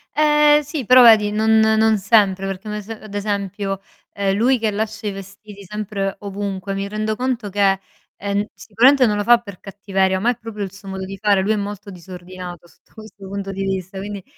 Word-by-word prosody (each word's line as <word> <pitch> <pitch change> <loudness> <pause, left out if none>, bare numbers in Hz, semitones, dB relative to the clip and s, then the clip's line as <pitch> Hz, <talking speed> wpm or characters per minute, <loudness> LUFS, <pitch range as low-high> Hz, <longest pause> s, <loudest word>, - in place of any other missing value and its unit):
Ehm, 300 0 +5
sì, 295 -3 -5
però 255 +2 +7
vedi 215 -3 +6
non 220 +1 +3
non 220 0 +3
sempre 195 -2 +2
perché 195 +2 -6
un 210 - -4
ese 210 +1 -7
ad 215 -2 -12
esempio, 200 -1 -3 0.3
ehm, 195 -1 0
lui 250 +5 +3
che 220 -1 0
lascia 220 +1 -4
i - - -1
vestiti 200 +1 -11
sempre 200 0 -4
ovunque 200 -1 -5
mi 195 0 -3
rendo 215 +1 -2
conto 245 -3 -2
che, 195 -1 +2 0.4
ehm, 200 0 -2
n 205 - -1
sicuramente 255 +5 +3
non 210 -3 +1
lo 205 - -1
fa 240 +2 +6
per 200 -6 -12
cattiveria, 195 -1 -1
ma 235 +5 +2
è 245 - -6
proprio 225 -3 -6
il 190 - -5
suo 195 +1 -14
modo 190 0 -5
di 195 +1 -8
fare. 200 -1 +2
Lui 200 +3 0
è - - +2
molto 205 0 -5
disordinato 180 -1 -10
sotto - - -28
questo 215 -3 -12
punto 195 0 -5
di 195 0 -4
vista, 190 0 -4
quindi 200 0 -6
205 Hz, 210 wpm, -20 LUFS, 195-220 Hz, 0.4 s, però